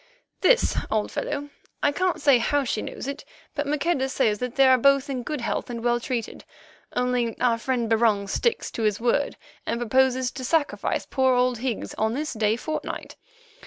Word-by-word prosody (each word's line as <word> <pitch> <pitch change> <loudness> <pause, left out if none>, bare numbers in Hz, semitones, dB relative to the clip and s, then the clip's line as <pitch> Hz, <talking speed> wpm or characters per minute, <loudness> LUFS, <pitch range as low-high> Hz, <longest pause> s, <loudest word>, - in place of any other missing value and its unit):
"This, - - +3
old 215 -1 0
fellow. 290 0 -3 0.3
I 290 - +4
can't 365 +4 0
say 275 -4 +5
how 285 +4 +1
she 235 -4 -2
knows - - -6
it, 280 +1 -5 0.3
but 290 -1 -2
Maqueda 295 -2 0
says 220 -6 +1
that 250 0 -4
they 275 - +5
are 260 -1 +6
both 275 +2 +3
in 255 -2 -2
good 295 +2 -4
health 235 - -2
and 235 -1 -5
well 240 0 +2
treated. 240 -1 -4 0.5
Only 245 -2 0
our 235 -2 +2
friend 245 -1 -1
Barung 220 -3 +2
sticks 470 - 0
to - - -5
his 210 -2 +1
word 245 +5 0 0.3
and 235 - -2
proposes 255 +1 +2
to 265 - -7
sacrifice 295 +3 0
poor 260 -1 +2
old 250 -1 +2
Higgs 250 -3 -3
on 220 +2 +1
this 305 +2 -3
day 215 -1 +1
fortnight. 310 +6 -5
250 Hz, 185 wpm, -25 LUFS, 230-280 Hz, 0.5 s, are